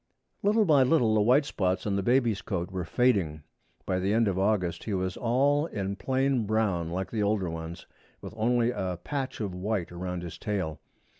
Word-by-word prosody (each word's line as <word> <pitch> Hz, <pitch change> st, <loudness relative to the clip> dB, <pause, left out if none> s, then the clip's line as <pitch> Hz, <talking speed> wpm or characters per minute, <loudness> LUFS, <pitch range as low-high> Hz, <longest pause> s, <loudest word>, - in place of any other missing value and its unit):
Little 210 Hz, +2 st, +3 dB
by 150 Hz, -6 st, +5 dB
little 125 Hz, -4 st, +3 dB
the 110 Hz, -, +3 dB
white 130 Hz, +7 st, +4 dB
spots 95 Hz, -8 st, -1 dB
on 100 Hz, -2 st, 0 dB
the 100 Hz, -, +1 dB
baby's 120 Hz, -1 st, +2 dB
coat 90 Hz, -2 st, -3 dB
were 90 Hz, -2 st, -3 dB
fading. 95 Hz, -, +1 dB, 0.4 s
By 95 Hz, -1 st, 0 dB
the 95 Hz, +2 st, 0 dB
end 115 Hz, -1 st, +3 dB
of 95 Hz, -1 st, 0 dB
August 95 Hz, -4 st, 0 dB
he 105 Hz, -, -1 dB
was 95 Hz, 0 st, -2 dB
all 140 Hz, +6 st, +2 dB
in 100 Hz, -, -3 dB
plain 130 Hz, -2 st, 0 dB
brown 100 Hz, -6 st, 0 dB
like 95 Hz, +3 st, -3 dB
the 110 Hz, -, -1 dB
older 100 Hz, -4 st, 0 dB
ones, 80 Hz, +1 st, -7 dB, 0.3 s
with -, -, -9 dB
only 120 Hz, +2 st, +2 dB
a 95 Hz, -7 st, -3 dB
patch 140 Hz, -3 st, -3 dB
of 100 Hz, -4 st, -3 dB
white 95 Hz, -1 st, -2 dB
around 90 Hz, 0 st, -4 dB
his 85 Hz, -, -8 dB
tail. 95 Hz, -7 st, -3 dB
105 Hz, 195 wpm, -28 LUFS, 90-120 Hz, 0.4 s, by